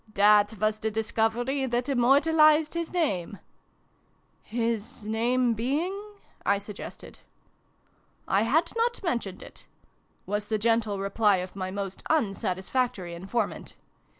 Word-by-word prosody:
That 210 +1 +5
was 215 0 +1
the 220 - -1
discovery 225 +5 0
that 240 0 0
immor 270 0 +4
talised 310 -1 +4
his 335 -1 -3
name! 205 - -1 0.4
" - - -40
" - - -40 0.2
His 230 -1 -2
name 235 +3 +1
being? 280 - -1 0.3
" - - -32 0.2
I 200 - +3
suggested. 205 0 -9 0.6
" - - -39 0.3
I 195 - +3
had 275 +10 +2
not 470 -1 0
mentioned 235 - -2
it," - - -13 0.6
was 205 +1 -2
the 220 - 0
gentle 220 -1 +1
reply 200 +1 +2
of 180 +1 -5
my 185 -1 -3
most 195 0 -5
unsatisfactory 195 - -1
informant. 195 +5 -3
225 Hz, 135 wpm, -27 LUFS, 200-265 Hz, 0.6 s, That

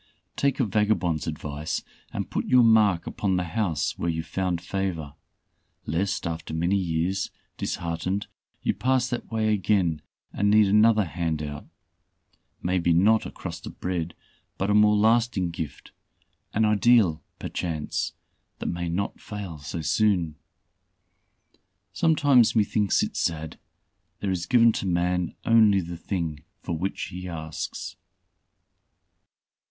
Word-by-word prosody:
Take 140 0 +1
a 130 - +3
vagabond's 100 -6 +1
advice, 75 -1 -4 0.3
and - - -4
put - - -2
your 125 -1 +6
mark 105 -6 +4
upon 95 -2 -1
the 90 - +1
house 85 -3 -1
where 85 - 0
you 80 -1 -2
found 90 +1 -2
favor, 85 -5 -3 0.7
lest 95 +6 -1
after 80 -1 -4
many 85 +4 +1
years, 90 +1 0 0.3
disheartened, 85 +4 -2 0.4
you - - +2
pass 125 +4 +1
that 120 - -4
way 110 -1 +1
again 95 -6 +1 0.3
and 100 +1 +1
need 105 0 +6
another 105 +1 +5
'handout' 80 -3 -3 1.0
maybe 90 -1 +2
not 105 +6 +4
a - - -8
crust - - -7
of - - -10
bread, 85 -2 -2 0.4
but, 100 +2 0
a - - +3
more 105 0 +5
lasting 110 -4 +2
gift 80 -3 -7 0.6
an 110 +1 +3
ideal 105 -6 +4 0.2
perchance, 80 -4 -3 0.4
that - - -7
may 85 0 -3
not 95 +4 -3
fail 100 -7 -7
so 75 +3 -5
soon. 90 -2 +1 1.6
Sometimes 145 -9 +4
methinks 105 -2 +2
it - - -4
sad, 80 -2 -2 0.6
there 100 - -1
is 90 -2 -2
given 115 0 +6
to 100 - -3
man 90 0 0
only 110 -4 +5
the 85 -1 -5
thing 85 -3 -3 0.2
for 85 - -2
which 95 +5 -3
he 90 +1 -7
asks. 80 0 -5
95 Hz, 130 wpm, -26 LUFS, 85-105 Hz, 1.6 s, your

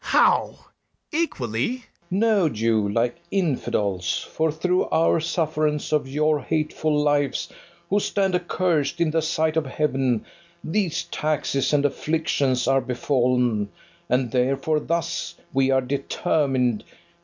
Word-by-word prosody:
BARABAS. - - -7
How! - - +3 0.5
equally? 130 - -1
FERNEZE. 250 - -19 0.3
No, 200 -3 +3
Jew, 110 -3 +1
like 120 +3 0
infidels; 105 - -1
For 160 0 +1
through 180 +4 +1
our 165 0 +2
sufferance 155 -2 -1
of 150 -3 +1
your 150 +2 +1
hateful 155 +1 0
lives, 145 -1 +1 0.4
Who 205 - +4
stand 195 -2 0
accursed 175 -4 0
in 165 -2 +2
the 160 +1 +1
sight 160 0 0
of 155 -4 0
heaven, 130 -4 0 0.4
These 175 0 -1
taxes 150 -3 -1
and 145 -1 +2
afflictions 145 -4 0
are 135 0 +3
befall'n, 125 -4 +1 0.4
And 125 -2 +1
therefore 135 +5 +1
thus 170 +1 -2 0.2
we 135 0 +2
are 135 0 +3
determined. 135 -2 0
150 Hz, 125 wpm, -24 LUFS, 130-160 Hz, 0.5 s, Who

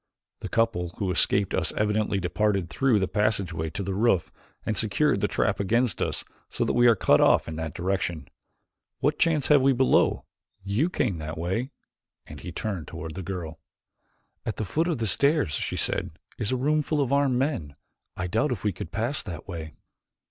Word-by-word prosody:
The - - -6
couple 115 -7 +1
who 95 -3 -1
escaped 100 +2 +2
us - - 0
evidently 105 -1 +1
departed 95 0 0
through 130 -5 +2
the 95 -2 +1
passageway 95 -7 0
to 100 +5 -4
the 95 +1 -3
roof 100 -3 +2 0.3
and - - -1
secured - - +2
the - - +2
trap - - 0
against 115 +2 +1
us - - -1 0.3
so - - -1
that - - 0
we 120 0 +5
are 115 - +6
cut - - +4
off - - +4
in 80 - -5
that 80 -1 -4
direction. 90 -3 -2 0.7
What 150 +1 0
chance 165 -6 +2
have 145 -2 +6
we 135 +1 +4
below? 130 +1 +2 0.4
You 105 - +1
came 110 - -1
that 80 +1 -5
way," 95 +10 -2 0.6
and - - -10
he 90 - -7
turned 95 -2 -4
toward 80 0 -7
the 95 - -6
girl. 85 -3 -6 0.8
"At 110 - -3
the 110 - -3
foot 160 - 0
of 165 -5 0
the 115 - -1
stairs," 140 - +3
she - - -2
said, 90 - +1 0.3
"is 105 -1 -1
a 130 - +1
room 150 +4 +2
full 150 +1 -1
of 140 -1 +1
armed 140 -3 +3
men. 125 - -2 0.4
I 95 - -2
doubt 115 +11 0
if 115 -7 -3
we 105 -2 +1
could 85 - -7
pass 120 +6 -1
that 90 -4 -8
way." 80 -4 -7
105 Hz, 195 wpm, -26 LUFS, 90-130 Hz, 0.8 s, are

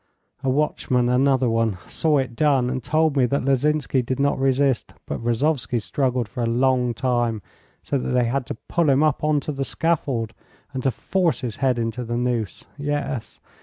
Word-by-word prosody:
A 135 - +1
watchman, 130 -3 +1
another 130 0 +3
one, 115 -3 +1
saw 155 -2 +1
it 130 -3 -2
done, 135 -3 +2
and 130 -2 -3
told 155 +1 +2
me 130 -3 +3
that 140 0 -1
Lozinsky 140 0 +2
did 130 +2 -3
not 140 -1 +1
resist, 135 -1 +1
but - - -5
Rozovsky 120 +1 0
struggled 125 0 -1
for 105 +5 -6
a 115 - +1
long 125 0 +2
time, 120 -4 0 0.4
so 140 - -1
that - - -3
they 125 -1 +2
had 125 +2 -1
to - - -4
pull 170 -3 +2
him 135 +2 +4
up 155 -2 +1
on 150 -1 +3
to 150 - -4
the 135 -1 -2
scaffold 135 -8 -1 0.4
and 130 - -3
to 135 - +2
force 175 +6 0
his 120 -4 -4
head 130 -3 +1
into 115 +1 -2
the 120 0 -3
noose. 120 -5 -2
Yes. 145 -5 -3
130 Hz, 190 wpm, -23 LUFS, 120-140 Hz, 0.4 s, him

